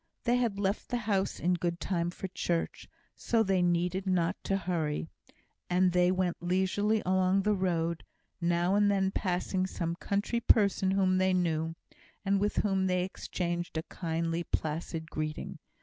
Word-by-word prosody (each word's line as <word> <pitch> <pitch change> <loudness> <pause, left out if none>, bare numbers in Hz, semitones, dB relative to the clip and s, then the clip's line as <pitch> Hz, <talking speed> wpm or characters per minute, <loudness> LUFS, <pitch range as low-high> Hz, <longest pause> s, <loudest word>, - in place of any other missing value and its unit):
They 245 0 +3
had 235 -5 0
left 200 +1 -1
the 245 - 0
house 205 -4 -1
in 180 +1 +2
good 170 0 -1
time 175 -2 -1
for 185 +2 -6
church, 170 -2 -2 0.3
so 230 -1 +1
they 190 -3 +2
needed 175 +2 +1
not 180 0 +2
to 195 - +1
hurry; 165 -4 -2 0.6
and 180 +1 +3
they 180 0 +4
went 185 -2 -1
leisurely 190 +4 +1
along 185 +1 +2
the 210 +1 +3
road, 170 -4 0 0.4
now 175 +2 +2
and 205 0 +4
then 195 -1 +2
passing 185 0 -1
some 170 -2 -3
country 200 +6 -1
person 200 -4 +3
whom 190 -1 +2
they 185 0 +3
knew, 165 -2 0 0.5
and 195 0 +2
with 205 +1 0
whom 195 -2 +1
they 180 -1 +1
exchanged 175 -2 -3
a 160 - -1
kindly, 165 0 -2
placid 160 0 -3
greeting. 155 0 -4
185 Hz, 160 wpm, -30 LUFS, 170-195 Hz, 0.6 s, they